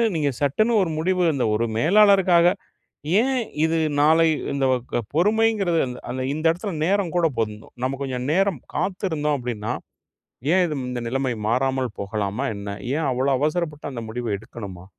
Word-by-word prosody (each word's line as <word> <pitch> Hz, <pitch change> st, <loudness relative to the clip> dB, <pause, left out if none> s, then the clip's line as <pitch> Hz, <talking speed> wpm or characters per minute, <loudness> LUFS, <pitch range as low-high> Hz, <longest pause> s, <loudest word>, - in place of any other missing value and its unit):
நீங்க 145 Hz, -3 st, +1 dB
சட்டுன்னு 215 Hz, -, +2 dB
ஒரு 170 Hz, -, -2 dB
முடிவு 180 Hz, +2 st, +1 dB
இந்த 125 Hz, -4 st, +1 dB
ஒரு 115 Hz, +2 st, +1 dB
மேலாளருக்காக 185 Hz, -, +5 dB, 0.7 s
ஏன் 265 Hz, +2 st, 0 dB, 0.3 s
இது 165 Hz, 0 st, +1 dB, 0.2 s
நாளை 160 Hz, +2 st, +5 dB, 0.3 s
இந்த 140 Hz, -1 st, 0 dB
வ -, -, +4 dB, 0.2 s
க -, -, +2 dB, 0.2 s
பொறுமைங்கிறது 205 Hz, -1 st, +2 dB
அந்த 125 Hz, -, -7 dB
அந்த 130 Hz, +1 st, -3 dB
இந்த 155 Hz, +2 st, -4 dB
இடத்தில 185 Hz, +5 st, -4 dB
நேரம் 195 Hz, -2 st, +1 dB
கூட 175 Hz, -2 st, +4 dB
போருந்தும். 105 Hz, -1 st, -4 dB
நம்ம 135 Hz, +1 st, -1 dB
கொஞ்ச 130 Hz, -2 st, -3 dB
நேரம் 190 Hz, -2 st, +2 dB, 0.2 s
காத்திருந்தோம் 160 Hz, -7 st, -1 dB
அப்படின்னா, 115 Hz, -4 st, -3 dB, 0.8 s
ஏன் 185 Hz, 0 st, +4 dB
இது 155 Hz, -3 st, -3 dB
இந்த 125 Hz, -1 st, -3 dB
நிலைமை 130 Hz, +1 st, -1 dB, 0.2 s
மாறாமல் 130 Hz, -1 st, 0 dB
போகலாமா 100 Hz, +5 st, -2 dB
என்ன? 100 Hz, 0 st, -7 dB, 0.3 s
ஏன் 155 Hz, -1 st, 0 dB
அவ்வளோ 130 Hz, +2 st, +1 dB
அவசரப்பட்டு 150 Hz, 0 st, -2 dB
அந்த 120 Hz, -2 st, -5 dB
முடிவை 120 Hz, +1 st, -4 dB
எடுக்கணுமா? 100 Hz, -4 st, -9 dB
150 Hz, 155 wpm, -23 LUFS, 125-180 Hz, 0.8 s, மேலாளருக்காக